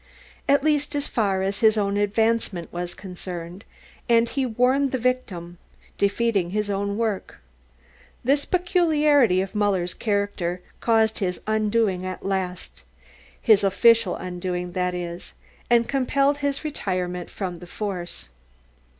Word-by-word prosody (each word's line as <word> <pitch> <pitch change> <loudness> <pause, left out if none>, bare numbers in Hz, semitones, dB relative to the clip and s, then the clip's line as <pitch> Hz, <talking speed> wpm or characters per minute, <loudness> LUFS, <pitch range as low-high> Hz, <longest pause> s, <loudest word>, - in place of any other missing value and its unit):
at 280 0 +4
least 295 -1 +1
as 285 0 -1
far 195 -4 0
as 195 +1 -1
his 220 -1 +4
own 200 -1 +1
advancement 205 -3 0
was 175 0 -4
concerned, 180 0 -8 0.5
and 230 0 +4
he 270 -1 -1
warned 255 +4 +2
the 260 - 0
victim, 195 -9 -2 0.4
defeating 200 -2 +1
his 210 +1 -1
own 200 +1 -1
work. 220 -4 -2 0.9
This 280 +3 +2
peculiarity 305 - +3
of 190 - -5
Muller's 195 -4 +1
character 200 -4 -2 0.2
caused 220 -1 +2
his 180 -2 -1
undoing 215 -3 +1
at 185 0 -6
last, 190 -2 -3 0.6
his 215 -4 +4
official 225 0 +4
undoing 180 0 -4
that 180 0 -1
is, 175 0 -6 0.4
and 235 -1 +4
compelled 275 +1 +1
his 285 0 -1
retirement 180 - -3
from 180 -4 -5
the 180 - -11
force. 180 - -5
205 Hz, 130 wpm, -24 LUFS, 180-235 Hz, 0.9 s, at